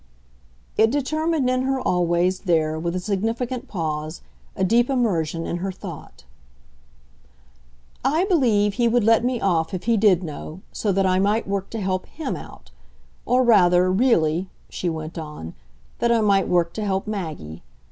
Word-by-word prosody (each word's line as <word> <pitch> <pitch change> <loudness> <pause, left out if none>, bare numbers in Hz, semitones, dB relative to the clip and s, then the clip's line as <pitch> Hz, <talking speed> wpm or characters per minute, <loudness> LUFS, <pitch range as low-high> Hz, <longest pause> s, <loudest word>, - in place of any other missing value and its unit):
It 225 - +5
determined 310 +2 0
in 255 0 +1
her 265 0 0
always, 180 -2 +1
there, 160 -4 0
with 170 +2 -2
a - - 0
significant 225 +6 -2
pause, 155 -3 -4 0.3
a 190 - -1
deep 235 +6 +3
immersion 170 - 0
in 175 - -2
her 190 +2 -3
thought. 180 - -10 1.8
"I 320 +6 +2
believe 230 - +2
he 240 +2 +2
would 235 0 +2
let 225 +2 +4
me 250 -1 0
off 170 -3 0
if 180 - -5
he 230 -1 +2
did 195 -4 +4
know 155 +2 -7
so 210 - -1
that 195 0 +1
I 185 0 +2
might 210 +4 +1
work 195 -1 -2
to 225 - -5
help 185 -2 -2
HIM 320 - -5
out. - - -12 0.6
Or 255 +1 +3
rather, 185 -6 +5
really," 185 -6 +2 0.2
she 180 - -2
went 160 +1 -5
on, 150 - -8 0.5
"that 235 - +2
I 230 -1 +3
might 200 -3 +3
work 170 -1 +1
to 215 - -4
help 195 -1 -1
Maggie. 160 - -5
195 Hz, 165 wpm, -23 LUFS, 170-235 Hz, 1.8 s, It